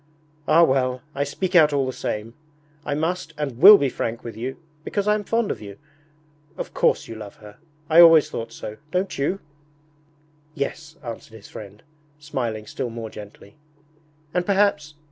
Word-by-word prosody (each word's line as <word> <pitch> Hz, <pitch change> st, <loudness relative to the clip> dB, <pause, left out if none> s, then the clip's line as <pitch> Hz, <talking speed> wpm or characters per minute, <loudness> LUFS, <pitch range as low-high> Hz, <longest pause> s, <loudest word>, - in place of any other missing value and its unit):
'Ah 165 Hz, +2 st, +6 dB
well, 130 Hz, -3 st, +1 dB
I -, -, -9 dB
will 140 Hz, -, +2 dB
speak 185 Hz, +6 st, -3 dB
out 155 Hz, -3 st, +7 dB
all 140 Hz, -2 st, +1 dB
the 130 Hz, -, -3 dB
same... 110 Hz, 0 st, -4 dB, 0.5 s
I 145 Hz, -, 0 dB
must 165 Hz, +1 st, -2 dB
and 140 Hz, -5 st, -4 dB
will 200 Hz, +5 st, +11 dB
be 140 Hz, -, +1 dB
frank 115 Hz, -2 st, -4 dB
with 115 Hz, -3 st, -7 dB
you 125 Hz, +4 st, -5 dB, 0.3 s
because 205 Hz, +4 st, -2 dB
I 210 Hz, -, +5 dB
am 210 Hz, 0 st, -1 dB
fond 230 Hz, +1 st, 0 dB
of -, -, -6 dB
you... 100 Hz, -1 st, -10 dB, 0.8 s
Of -, -, -6 dB
course -, -, +1 dB
you -, -, -7 dB
love 105 Hz, -2 st, -9 dB
her 105 Hz, -1 st, -14 dB, 0.3 s
I 165 Hz, +1 st, +7 dB
always 165 Hz, -3 st, +8 dB
thought 115 Hz, 0 st, -6 dB
so 110 Hz, -1 st, -8 dB
don't 185 Hz, +3 st, -1 dB
you?' 150 Hz, +8 st, -1 dB, 1.2 s
'Yes,' 155 Hz, +2 st, -5 dB
answered 115 Hz, -2 st, -8 dB
his 105 Hz, -2 st, -13 dB
friend, 105 Hz, 0 st, -11 dB, 0.3 s
smiling 120 Hz, -8 st, -4 dB
still 120 Hz, -, -4 dB
more 115 Hz, -1 st, -7 dB
gently. 105 Hz, +1 st, -12 dB, 0.8 s
'And 180 Hz, -, +1 dB
perhaps...' 190 Hz, -6 st, +1 dB
140 Hz, 175 wpm, -23 LUFS, 115-165 Hz, 1.2 s, will